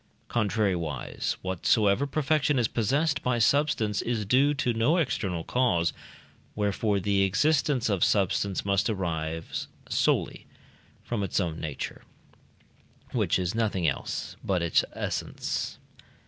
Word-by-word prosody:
Contrariwise, 95 Hz, -, -1 dB
whatsoever 100 Hz, +6 st, +2 dB
perfection 150 Hz, 0 st, +1 dB
is 120 Hz, -3 st, +3 dB
possessed 145 Hz, +9 st, +1 dB
by 125 Hz, -1 st, 0 dB
substance 115 Hz, -4 st, +2 dB
is 115 Hz, -3 st, -2 dB
due 130 Hz, +7 st, +4 dB
to 125 Hz, -3 st, 0 dB
no 115 Hz, +10 st, +2 dB
external 95 Hz, -, -1 dB
cause; 90 Hz, -10 st, +1 dB, 0.6 s
wherefore 105 Hz, 0 st, 0 dB
the 100 Hz, +1 st, +1 dB
existence 140 Hz, +5 st, +2 dB
of 100 Hz, -5 st, +1 dB
substance 100 Hz, -1 st, +1 dB
must 100 Hz, +1 st, +2 dB
arise 80 Hz, -5 st, -3 dB, 0.2 s
solely -, -, 0 dB, 0.6 s
from 115 Hz, -3 st, -2 dB
its 100 Hz, -, 0 dB
own 85 Hz, -4 st, -2 dB
nature, 75 Hz, -3 st, -5 dB, 1.1 s
which -, -, +1 dB
is 90 Hz, 0 st, -1 dB
nothing 105 Hz, -7 st, 0 dB
else 70 Hz, -, -3 dB
but 90 Hz, -3 st, 0 dB
its 85 Hz, -, +3 dB
essence. -, -, -3 dB
105 Hz, 120 wpm, -27 LUFS, 90-125 Hz, 1.1 s, due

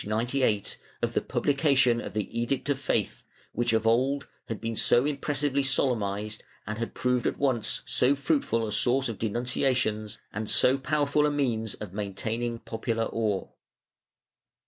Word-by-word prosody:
98) 110 Hz, 0 st, 0 dB, 0.2 s
of -, -, 0 dB
the -, -, +1 dB
publication 135 Hz, -5 st, +2 dB
of -, -, -7 dB
the 105 Hz, -2 st, 0 dB
Edict 120 Hz, +4 st, -1 dB
of 140 Hz, -2 st, +1 dB
Faith, 135 Hz, -, -1 dB, 0.3 s
which 120 Hz, 0 st, 0 dB
of 110 Hz, 0 st, +1 dB
old 130 Hz, +5 st, +2 dB, 0.2 s
had 115 Hz, -, -4 dB
been 115 Hz, +1 st, -3 dB
so 120 Hz, +4 st, +3 dB
impressively 145 Hz, -1 st, 0 dB
solemnized 110 Hz, -6 st, 0 dB, 0.2 s
and 105 Hz, +1 st, -4 dB
had 115 Hz, -, -4 dB
proved 125 Hz, -1 st, +1 dB
at -, -, -1 dB
once 130 Hz, -5 st, 0 dB
so 130 Hz, +3 st, +3 dB
fruitful 135 Hz, -5 st, +1 dB
a 105 Hz, -, -4 dB
source 125 Hz, +5 st, +2 dB
of 110 Hz, -4 st, -5 dB
denun 115 Hz, +2 st, -1 dB
ciations 115 Hz, -4 st, 0 dB, 0.2 s
and 105 Hz, +1 st, -3 dB
so 130 Hz, -, +4 dB
powerful 150 Hz, +1 st, +2 dB
a -, -, +2 dB
means 120 Hz, -7 st, -1 dB
of 100 Hz, -4 st, -8 dB
maintaining 110 Hz, +4 st, -3 dB
popular 115 Hz, 0 st, -2 dB
awe. 105 Hz, -4 st, 0 dB
120 Hz, 155 wpm, -28 LUFS, 110-135 Hz, 0.3 s, so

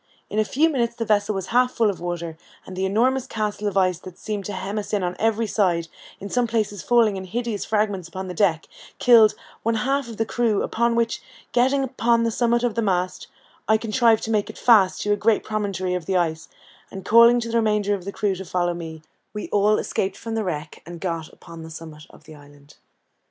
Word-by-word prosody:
In 215 Hz, -, 0 dB
a -, -, +4 dB
few 290 Hz, +9 st, +2 dB
minutes 235 Hz, -6 st, -1 dB
the 230 Hz, -, -3 dB
vessel 210 Hz, -1 st, +1 dB
was 190 Hz, -2 st, -3 dB
half 250 Hz, +1 st, +3 dB
full 225 Hz, -3 st, +2 dB
of 190 Hz, -, -10 dB
water, 170 Hz, -2 st, -4 dB, 0.3 s
and 185 Hz, -, -9 dB
the 190 Hz, +1 st, 0 dB
enormous 250 Hz, +6 st, +1 dB
castle 210 Hz, -1 st, -3 dB
of 200 Hz, -1 st, -2 dB
ice 185 Hz, -3 st, +2 dB
that 185 Hz, -1 st, -11 dB
seemed 210 Hz, -3 st, -4 dB
to 205 Hz, -, -4 dB
hem 195 Hz, +3 st, -3 dB
us 210 Hz, -, -7 dB
in 205 Hz, -3 st, +1 dB
on 180 Hz, 0 st, -2 dB
every 225 Hz, 0 st, +1 dB
side, 175 Hz, -6 st, 0 dB, 0.3 s
in 200 Hz, -, -6 dB
some 245 Hz, +3 st, 0 dB
places 215 Hz, -4 st, -1 dB
falling 230 Hz, -4 st, +3 dB
in 190 Hz, -, -6 dB
hideous 230 Hz, +1 st, -3 dB
fragments 205 Hz, -5 st, -1 dB
upon 190 Hz, +2 st, -6 dB
the 180 Hz, -, -5 dB
deck, 165 Hz, -4 st, +1 dB, 0.3 s
killed 225 Hz, -3 st, +6 dB, 0.3 s
one 230 Hz, 0 st, 0 dB
half 270 Hz, +4 st, 0 dB
of 225 Hz, -, -8 dB
the 225 Hz, -, 0 dB
crew; 225 Hz, -3 st, 0 dB
upon 235 Hz, +1 st, 0 dB
which, 230 Hz, 0 st, 0 dB, 0.3 s
getting 265 Hz, +3 st, +2 dB
upon 235 Hz, -3 st, +1 dB
the 230 Hz, -, +1 dB
summit 235 Hz, +1 st, +1 dB
of 240 Hz, -3 st, +1 dB
the 230 Hz, -, -1 dB
mast, 185 Hz, -3 st, -1 dB, 0.4 s
I 220 Hz, +1 st, +4 dB
contrived 225 Hz, 0 st, +2 dB
to 225 Hz, -, -3 dB
make 210 Hz, -2 st, 0 dB
it -, -, -9 dB
fast 210 Hz, -6 st, +4 dB
to 205 Hz, -, +2 dB
a -, -, +2 dB
great 215 Hz, +1 st, +2 dB
promontory 200 Hz, -4 st, -2 dB
of 180 Hz, -3 st, -4 dB
the 190 Hz, -, +1 dB
ice, 160 Hz, -2 st, -1 dB, 0.4 s
and 190 Hz, -1 st, -9 dB
calling 235 Hz, +2 st, +6 dB
to 230 Hz, -1 st, -4 dB
the 235 Hz, -, +1 dB
remainder 210 Hz, -2 st, +1 dB
of 195 Hz, -3 st, -3 dB
the 200 Hz, -, -4 dB
crew 200 Hz, -1 st, -1 dB
to 190 Hz, +1 st, -6 dB
follow 175 Hz, -1 st, -1 dB
me, 160 Hz, -2 st, -8 dB, 0.3 s
we 210 Hz, -, -5 dB
all 210 Hz, +1 st, +3 dB
escaped 190 Hz, 0 st, -2 dB
from 225 Hz, -1 st, -6 dB
the 225 Hz, -1 st, -1 dB
wreck, 155 Hz, -5 st, -5 dB
and 170 Hz, +1 st, -9 dB
got 165 Hz, -3 st, -4 dB
upon 165 Hz, -1 st, -12 dB
the 160 Hz, -, -9 dB
summit 160 Hz, -1 st, -10 dB
of -, -, -18 dB
the 155 Hz, 0 st, -13 dB
island. 145 Hz, -1 st, -17 dB
205 Hz, 230 wpm, -23 LUFS, 180-230 Hz, 0.4 s, killed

